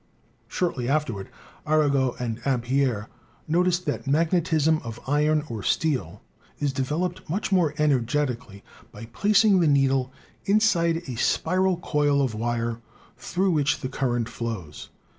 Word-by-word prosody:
Shortly 135 -9 -2
afterward 130 -10 -1 0.4
Arago 140 -4 +2
and 120 -1 -4
Ampere 125 -4 0 0.4
noticed 175 +2 +1
that - - -3
magnetism 160 0 +2
of 115 0 -7
iron 150 +2 +2
or 115 -3 -5
steel 105 - -1 0.3
is 145 -2 -1
developed 155 +8 -2
much 195 +5 -2
more 170 -6 +2
energetically 125 -6 0 0.3
by 105 +2 -9
plac 200 - +2
ing 200 -3 +5
the 170 - +3
needle 135 -2 +2 0.3
inside 180 -6 +2
a 130 - -4
spiral 185 +7 +1
coil 145 -4 +1
of 130 -4 -1
wire 115 +1 -2 0.3
through 175 +10 -1
which 145 -3 +1
the 130 - -3
current 120 -3 -1
flows. 110 -11 -6
140 Hz, 130 wpm, -25 LUFS, 120-165 Hz, 0.4 s, ing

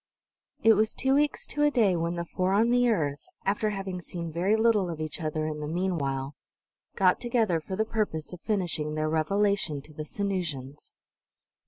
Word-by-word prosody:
It 225 - +8
was 215 +1 +2
two 265 0 +2
weeks 290 +1 +2
to 295 - -3
a 295 - +5
day 220 -10 +3
when 170 +1 -1
the 170 0 -3
four 185 +2 -1
on 225 +4 +3
the 245 0 +4
earth, 145 -10 0 0.2
after 210 +2 +1
having 195 -3 -4
seen 170 -2 -6
very 185 +6 +2
little 220 -4 +3
of 165 -2 -5
each 155 +1 -4
other 155 0 -2
in 155 -1 -3
the 150 - -4
meanwhile, 150 -6 -1 0.6
got 185 -2 +3
together 225 -9 +1
for 190 - -5
the 220 +3 +1
purpose 200 -9 -2
of 180 - -9
finishing 170 -7 -1
their 155 0 0
"revelation" 195 -1 +1
to 155 - -14
the 155 - -5
Sanusians. 155 -7 -4
180 Hz, 185 wpm, -28 LUFS, 155-215 Hz, 0.6 s, It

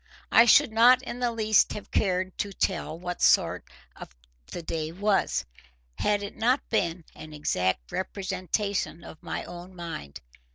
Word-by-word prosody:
I 230 - +7
should 255 +2 +6
not 245 +3 +6
in 240 - -6
the 245 -1 0
least 220 -2 +3
have 210 - -9
cared 185 -2 0
to 200 - -2
tell 185 -4 -2
what 180 0 -6
sort - - +3 0.8
the 175 - -7
day 160 -1 -3
was, 200 +3 0 0.5
had 205 -1 +1
it 200 - -7
not 245 +5 +1
been 170 -6 0
an 155 0 -11
exact 90 - -1
representation 190 -1 -3
of 160 - -12
my - - -4
own 175 +1 -10
mind. 165 - -7
190 Hz, 150 wpm, -27 LUFS, 170-215 Hz, 0.8 s, I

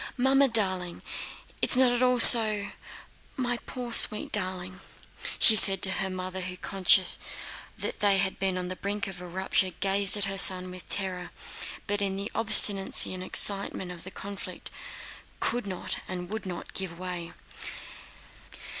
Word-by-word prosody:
"Mamma 270 +2 +2
darling, 185 -7 -2 0.6
it's - - +4
not 255 -1 +3
at 245 0 -3
all 250 -1 +1
so... 215 -4 +7 0.7
my 245 -2 -2
poor, 245 -2 -7
sweet 215 - +5
darling," 185 -2 -5 0.6
she 220 - +5
said 195 -2 +7
to 190 - +6
her 190 0 -3
mother, 185 0 -7
who 180 0 -8
conscious 190 0 +1 0.6
that - - -6
they 200 -2 +2
had 190 0 -3
been 190 -1 -2
on 180 0 -5
the 185 - -7
brink 205 +2 -5
of 185 -2 -9
a 180 - -10
rupture 190 +1 -1
gazed 200 +1 +3
at 205 - 0
her 195 0 -4
son 185 -1 +3
with 180 -1 -13
terror, 185 -3 -5 0.6
but 205 0 -3
in 195 -1 -2
the 200 +2 -6
obstinacy 200 -4 +2
and 185 - -8
excitement 195 -1 +1
of 175 -2 -12
the 185 - -9
conflict 200 +1 -9 0.7
could 240 -4 -4
not 185 -2 -3
and 180 0 -8
would 220 -2 -7
not 175 -2 -8
give 185 -3 -7
way. 175 -2 -7
195 Hz, 160 wpm, -25 LUFS, 185-210 Hz, 0.7 s, so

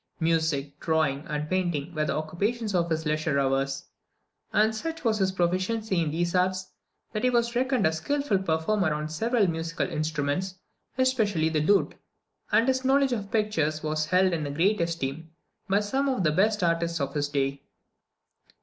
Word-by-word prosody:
Music, 160 -4 0
drawing, 155 -3 0
and 150 0 -3
painting 175 -3 -1
were 155 -2 0
the - - -1
occupations 200 +8 -2
of 170 -2 +1
his 160 0 -1
leisure 155 -1 0
hours; 135 0 0 0.7
and 220 +1 +3
such 325 +8 -5
was 220 -3 +1
his 190 -1 +2
proficiency 185 +2 0
in 160 - 0
these 170 +3 -1
arts, 185 0 0 0.4
that 215 - -2
he 255 - +4
was 235 -1 +1
reckoned 255 -2 +1
a 160 - +4
skilful 245 - 0
performer 175 +1 0
on 150 0 -3
several 220 +8 +1
musical 165 -1 -2
instruments, 155 +4 -2 0.4
especially 220 -11 +2
the 155 -1 0
lute; 200 +6 +3 0.6
and 230 - +4
his 260 0 +1
knowledge 270 0 +3
of 205 -4 -4
pictures 165 -9 0
was 155 0 -1
held 185 +1 +3
in 150 -4 -2
great 190 +5 +2
esteem 165 -2 -3 0.4
by 200 +1 +4
some 265 +7 0
of 255 -8 0
the 155 - +3
best 205 +5 +2
artists 170 0 +1
of 140 -1 -2
his 145 -1 -1
day. 140 -1 -1
170 Hz, 170 wpm, -27 LUFS, 155-210 Hz, 0.7 s, he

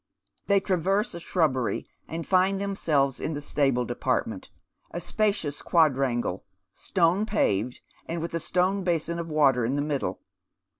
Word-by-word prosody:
They 200 -1 +4
traverse 195 +4 0
a 170 - -6
shrubbery, 150 -8 0 0.2
and 165 +1 -5
find 190 +1 +3
themselves 155 -9 0
in 155 - -3
the - - -3
stable 135 -4 +1
department, - - -2 0.4
a 175 - -5
spacious 185 -6 -1
quadrangle, 135 - +1 0.3
stone 180 +2 +1
paved, 110 - 0 0.3
with 165 0 -3
a 165 - 0
stone 185 +4 +1
basin 170 -1 -1
of 165 -1 -5
water 140 -5 +3
in 125 +5 0
the 145 - 0
middle. 145 -2 -2
165 Hz, 140 wpm, -26 LUFS, 140-185 Hz, 0.4 s, They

